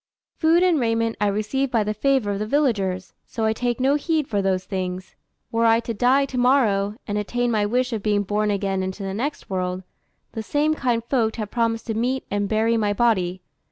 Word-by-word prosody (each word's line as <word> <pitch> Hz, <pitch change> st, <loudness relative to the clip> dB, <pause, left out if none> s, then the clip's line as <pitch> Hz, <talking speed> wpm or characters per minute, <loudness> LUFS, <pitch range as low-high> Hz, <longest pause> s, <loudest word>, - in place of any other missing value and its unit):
Food 330 Hz, +2 st, +4 dB
and 350 Hz, -4 st, +3 dB
raiment 230 Hz, -1 st, 0 dB
I 210 Hz, -, +3 dB
receive 215 Hz, +7 st, -1 dB
by 230 Hz, -3 st, +1 dB
the 210 Hz, +1 st, -2 dB
favour 255 Hz, -1 st, +1 dB
of 200 Hz, -, -2 dB
the 215 Hz, -, -2 dB
villagers, 205 Hz, -10 st, 0 dB
so 225 Hz, -, -2 dB
I 220 Hz, -, +2 dB
take 240 Hz, +1 st, -2 dB
no 265 Hz, +2 st, +3 dB
heed 305 Hz, 0 st, 0 dB
for 205 Hz, -2 st, 0 dB
those 190 Hz, -1 st, 0 dB
things. 185 Hz, -1 st, -4 dB, 0.4 s
Were 230 Hz, 0 st, +2 dB
I 225 Hz, 0 st, +5 dB
to 230 Hz, -, -4 dB
die 255 Hz, +6 st, +3 dB
to 260 Hz, -2 st, -4 dB
morrow, 215 Hz, -6 st, +2 dB
and 205 Hz, 0 st, -1 dB
attain 245 Hz, +4 st, -1 dB
my 210 Hz, -2 st, +1 dB
wish 250 Hz, +3 st, 0 dB
of 220 Hz, -, -2 dB
being 205 Hz, 0 st, +1 dB
born 210 Hz, +2 st, 0 dB
again 195 Hz, -1 st, -1 dB
into 190 Hz, +2 st, -4 dB
the 195 Hz, 0 st, -3 dB
next 270 Hz, +9 st, -3 dB
world, 185 Hz, -1 st, -2 dB, 0.5 s
the 225 Hz, -, -5 dB
same 295 Hz, +7 st, +1 dB
kind 245 Hz, -6 st, 0 dB
folk 235 Hz, -3 st, 0 dB
have 215 Hz, -3 st, -5 dB
promised 230 Hz, -1 st, 0 dB
to 225 Hz, -, -2 dB
meet 250 Hz, +4 st, -1 dB
and 205 Hz, 0 st, -1 dB
bury 225 Hz, +1 st, +2 dB
my 210 Hz, -2 st, +1 dB
body. 190 Hz, -5 st, +1 dB
225 Hz, 215 wpm, -23 LUFS, 205-250 Hz, 0.5 s, I